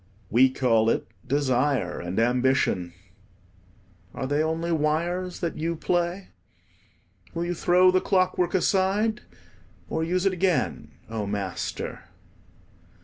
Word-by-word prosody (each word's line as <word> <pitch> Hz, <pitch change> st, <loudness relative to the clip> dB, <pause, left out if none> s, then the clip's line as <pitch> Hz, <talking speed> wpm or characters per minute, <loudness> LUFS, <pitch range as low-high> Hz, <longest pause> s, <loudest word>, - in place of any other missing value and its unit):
We 125 Hz, +4 st, +6 dB
call 115 Hz, -4 st, +2 dB
it -, -, 0 dB, 0.2 s
desire 130 Hz, -7 st, +1 dB
and 90 Hz, +2 st, -5 dB
ambition: 120 Hz, -7 st, +1 dB, 1.2 s
are -, -, -3 dB
they 145 Hz, +3 st, +1 dB
only 160 Hz, +2 st, -1 dB
wires 170 Hz, +4 st, -1 dB
that 170 Hz, -3 st, -3 dB
you 165 Hz, +2 st, -1 dB
play? 175 Hz, +3 st, -1 dB, 1.1 s
Will 170 Hz, +1 st, -1 dB
you 175 Hz, -, -1 dB
throw 180 Hz, +2 st, +4 dB
the 185 Hz, 0 st, +2 dB
clockwork 185 Hz, -2 st, +1 dB
aside, 195 Hz, +4 st, +1 dB, 0.7 s
or 160 Hz, -, 0 dB
use 180 Hz, +3 st, 0 dB
it 195 Hz, -, +3 dB
again, 180 Hz, -2 st, 0 dB, 0.2 s
O 110 Hz, -2 st, -4 dB
Master? 100 Hz, -2 st, -4 dB
160 Hz, 115 wpm, -25 LUFS, 125-180 Hz, 1.2 s, We